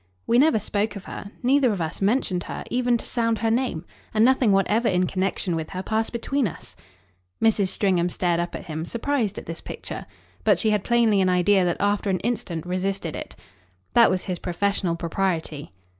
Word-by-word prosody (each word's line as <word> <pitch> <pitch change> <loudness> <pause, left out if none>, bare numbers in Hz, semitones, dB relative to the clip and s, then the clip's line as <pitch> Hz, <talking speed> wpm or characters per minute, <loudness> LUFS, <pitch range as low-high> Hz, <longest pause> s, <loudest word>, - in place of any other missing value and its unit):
"We 235 - +3
never 300 -3 +5
spoke 210 +1 -1
of 200 - -7
her. 200 - -8
Neither 260 0 +4
of 200 - -2
us 160 +2 -3
mentioned 195 -4 +1
her, - - -5
even 245 -1 +2
to - - -9
sound 230 -2 0
her 225 0 0
name, 230 -9 -1 0.3
and 215 +1 +5
nothing 255 -4 +4
whatever 210 +4 +2
in 180 0 +2
connexion 185 -1 -1
with 160 -1 -4
her 185 -1 -5
passed 220 +2 -1
between 255 +2 0
us." 165 - -8 0.6
Mrs. 215 -3 +3
Stringham 185 -2 +1
stared 175 -1 0
up 175 0 -3
at - - -7
him, 160 -2 -4
surprised 235 +2 -1
at - - -6
this 165 0 -6
picture. - - -7 0.4
But - - +4
she 220 - +2
had 210 -2 +1
plainly 230 -4 +3
an 185 - +3
idea 185 +2 +4
that 175 - 0
after 205 0 +1
an 185 -2 +1
instant 190 -8 -2
resisted 185 -2 -2
it. - - -7 0.6
"That 235 -1 +7
was 185 0 0
his 180 -2 -4
professional 180 -1 -1
propriety." 165 - -2
200 Hz, 195 wpm, -24 LUFS, 180-230 Hz, 0.6 s, That